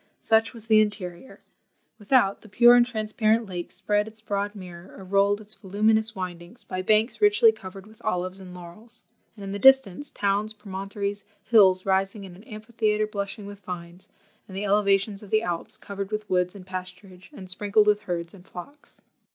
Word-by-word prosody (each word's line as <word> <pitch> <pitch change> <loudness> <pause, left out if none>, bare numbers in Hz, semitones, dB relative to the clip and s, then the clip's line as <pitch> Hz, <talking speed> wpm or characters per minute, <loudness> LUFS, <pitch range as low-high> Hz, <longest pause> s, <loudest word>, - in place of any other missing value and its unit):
Such 225 0 +2
was 230 -3 -9
the 220 -1 +5
interior! 205 0 -4 0.6
Without, 205 -2 +2
the 215 - -16
pure 240 +5 +7
and 245 - +6
transparent 220 -1 0
lake 175 -3 -6
spread 210 0 0
its 220 0 -10
broad 205 -1 -3
mirror, 180 -2 -11
or 195 - -10
rolled 200 +2 +2
its 215 0 -8
voluminous 215 +3 +1
windings, 180 +3 -7
by 185 -1 -4
banks 215 - +1
richly 415 +2 +6
covered 190 - -10
with 215 0 -18
olives 185 -2 -2
and 185 -1 -11
laurels; 180 +7 -12 0.3
and 200 - -9
in 195 - -5
the 200 - -4
distance, 265 0 +5
towns, 205 +2 -1
promontories, 200 0 -5 0.2
hills 190 -5 +5
rising 195 +1 0
in 185 -2 -10
an 195 - -15
amphitheatre 215 -1 -1
blushing 205 0 -5
with 200 0 -9
vines, 180 -1 -9 0.4
and 190 - -9
the 205 - -2
elevations 200 0 +2
of 205 - -12
the 215 +2 +2
Alps 175 -4 -3
covered 200 -1 -6
with 215 0 -4
woods 180 +1 0
and 190 -2 -11
pasturage, 185 0 -9
and 185 - -10
sprinkled 205 +3 +2
with 210 0 +3
herds 170 -1 -3
and 185 -2 -16
flocks. 285 +12 -12
200 Hz, 180 wpm, -25 LUFS, 185-215 Hz, 0.6 s, pure